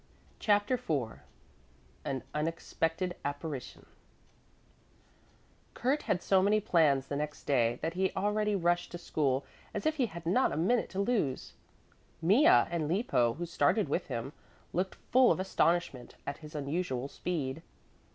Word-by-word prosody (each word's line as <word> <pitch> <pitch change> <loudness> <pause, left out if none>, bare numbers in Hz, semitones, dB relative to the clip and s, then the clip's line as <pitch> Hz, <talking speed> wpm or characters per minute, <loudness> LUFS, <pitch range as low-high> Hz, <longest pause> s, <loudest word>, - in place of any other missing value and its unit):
CHAPTER 205 +2 +2
IV 135 - -2 0.8
AN 135 -2 -3
UNEXPECTED 165 +3 -2
APPARITION 145 -2 -5 1.9
Kurt 275 +5 +1
had 180 - -1
so 190 -1 +4
many 205 +2 +3
plans 155 -9 +3
the 140 - -4
next 150 +1 -4
day 120 -4 +2
that 165 +1 -1
he 190 +1 +1
already 210 +1 +1
rushed 175 -1 +1
to - - -3
school 140 -5 0 0.3
as - - -3
if 310 0 +1
he 255 -4 +2
had 170 -3 -9
not 200 +10 +3
a - - -3
minute 210 +9 +2
to 190 - -5
lose. 200 - 0 0.7
Mea 205 - +5
and 170 - +4
Lippo, 155 - +1
who 175 - -4
started 170 +5 +1
with 175 - -1
him, 130 +2 -4 0.4
looked 185 +2 -1 0.2
full 255 0 +6
of - - +1
astonishment 170 -8 0
at 140 - -4
his 155 -1 -11
unusual 140 -3 -2
speed. 150 -3 -3
170 Hz, 140 wpm, -31 LUFS, 145-200 Hz, 1.9 s, full